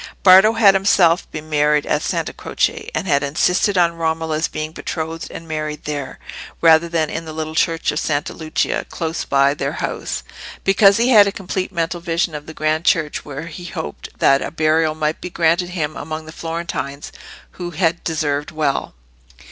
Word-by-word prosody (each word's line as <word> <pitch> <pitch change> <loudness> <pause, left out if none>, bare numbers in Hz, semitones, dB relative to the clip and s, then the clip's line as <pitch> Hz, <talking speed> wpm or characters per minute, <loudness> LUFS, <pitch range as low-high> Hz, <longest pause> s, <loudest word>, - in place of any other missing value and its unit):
Bardo 190 +3 +8
had 215 -4 +6
himself 190 -3 +3
been 155 0 -7
married 150 -1 +2
at - - 0
Santa - - -2
Croce, - - -2
and 160 - -1
had 140 -4 +3
insisted 180 +7 +1
on 170 -1 +3
Romola's 160 -1 -1
being 155 0 -5
betrothed 165 0 -5
and 165 - -9
married 155 -1 -4
there, 145 -3 -5 0.4
rather 165 0 +5
than 165 -2 0
in 165 - -4
the 160 - -7
little 155 0 -4
church 165 0 +1
of 150 - -2
Santa 145 -2 -1
Lucia 155 -1 -1
close 165 0 -3
by 140 0 +3
their - - -3
house, - - -4 0.4
because 195 +1 +5
he 235 +2 +2
had 210 -5 +7
a - - 0
complete 190 -1 -4
mental 170 -1 -2
vision 170 0 -1
of 150 0 -7
the 160 - -8
grand 155 +1 0
church 160 -4 +1
where 145 +1 -7
he 170 +2 -9
hoped 75 - -6
that 135 0 +4
a - - -3
burial 155 0 +1
might 155 0 -2
be 180 - -5
granted 170 +1 +1
him 155 -4 -3
among 155 +1 -6
the 155 - -9
Florentines 165 -4 -5 0.4
who 175 -1 -6
had 170 0 0
deserved 150 -3 -1
well. 150 - -2
160 Hz, 180 wpm, -19 LUFS, 155-175 Hz, 0.4 s, Bardo